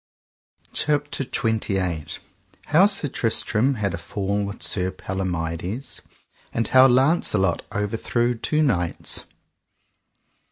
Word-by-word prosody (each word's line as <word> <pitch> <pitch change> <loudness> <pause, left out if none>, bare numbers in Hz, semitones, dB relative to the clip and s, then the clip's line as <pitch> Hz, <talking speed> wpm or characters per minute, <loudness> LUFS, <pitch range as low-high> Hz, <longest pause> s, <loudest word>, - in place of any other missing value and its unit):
CHAPTER 145 -2 -1
XXVII. 95 -10 -1 0.6
How 175 +7 +5
Sir 195 -7 +3
Tristram 120 +1 0
had 100 -5 -2
a 85 - -4
fall 100 +3 -2
with 100 +1 -5
Sir 90 -2 +2
Palomides, 95 - -4 0.5
and 115 - -1
how 130 0 +7
Launcelot 125 - +2
overthrew 115 +4 -1
two 150 +6 0
knights. 85 - -1
105 Hz, 95 wpm, -23 LUFS, 95-130 Hz, 0.6 s, how